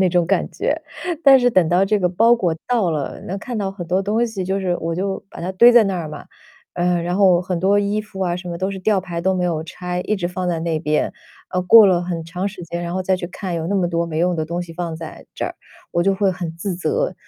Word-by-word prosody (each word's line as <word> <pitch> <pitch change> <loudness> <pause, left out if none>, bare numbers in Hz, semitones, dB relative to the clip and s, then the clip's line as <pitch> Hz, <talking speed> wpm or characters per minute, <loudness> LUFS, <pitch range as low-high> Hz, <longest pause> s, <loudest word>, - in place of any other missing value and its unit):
那 185 - +4
种 175 -1 +2
感 195 +2 +1
觉。 - - -2 0.4
但 270 -1 +8
是 245 - +3
等 185 -7 +3
到 180 +3 +3
这 210 +1 +1
个 180 - +1
包 225 +7 +4
裹 180 -8 0
到 225 -8 +1
了， 150 -3 -3
那 190 - -3
看 240 +3 -6
到 200 -2 -1
很 180 -3 -7
多 185 +3 +1
东 220 +4 +1
西， 210 -5 -4
就 190 +2 -1
是 180 -2 0
我 165 0 -2
就 190 +2 -2
把 - - -10
它 175 +2 -3
堆 235 +6 +7
在 235 -2 +7
那 195 -2 -1
儿 165 -3 -4
嘛， 150 -1 -9 0.5
嗯， 175 -1 +1
然 175 +1 -1
后 185 -3 +5
很 180 -1 -3
多 195 +3 +3
衣 205 +1 0
服 210 -2 -10
啊， 175 -2 0
什 180 0 -8
么 170 -1 -5
都 190 +2 -1
是 195 - -5
吊 195 +1 +1
牌 175 -2 -5
都 190 +2 +1
没 180 -1 0
有 165 -3 -1
拆， 180 +2 -4
一 215 - -1
直 175 -3 -2
放 180 +1 -4
在 170 -2 -1
那 165 -1 -1
边。 155 -1 0 0.4
呃， 180 0 -1
过 215 +3 +8
了 175 -2 +3
很 170 -2 -4
长 180 +4 -3
时 200 -2 -11
间， 170 +1 -5
然 170 0 -4
后 185 - -1
再 190 +1 +1
去 180 - -6
看， 185 0 -5
有 165 -1 -2
那 200 - 0
么 180 -2 +2
多 170 0 0
没 160 -2 -4
用 175 +2 +2
的 160 -2 -1
东 170 +2 -3
西 170 -1 -10
放 165 -1 -4
在 160 -1 -9
这 - - -4
儿， - - -4 0.4
我 170 - +2
就 195 - +3
会 195 0 +1
很 175 -2 -5
自 185 +2 -3
责， 475 - -1
180 Hz, 300 characters per minute, -20 LUFS, 170-195 Hz, 0.5 s, 但